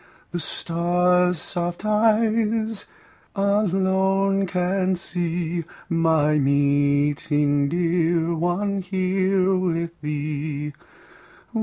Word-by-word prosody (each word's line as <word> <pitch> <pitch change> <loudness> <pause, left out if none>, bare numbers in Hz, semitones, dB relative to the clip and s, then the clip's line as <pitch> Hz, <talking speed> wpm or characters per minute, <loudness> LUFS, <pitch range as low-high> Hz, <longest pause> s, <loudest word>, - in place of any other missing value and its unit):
The 175 - -3
stars' 180 +2 +1
soft 175 +3 -3
eyes 220 0 +1 0.5
alone 195 -1 +1
can 185 +1 0
see 170 0 -2 0.3
My 160 -2 +2
meeting, 145 +1 +1
dear 170 0 +1
one, 185 +4 -1
here 190 0 +1
with 170 -2 -2
thee. 150 0 -4
175 Hz, 70 wpm, -23 LUFS, 160-190 Hz, 0.5 s, My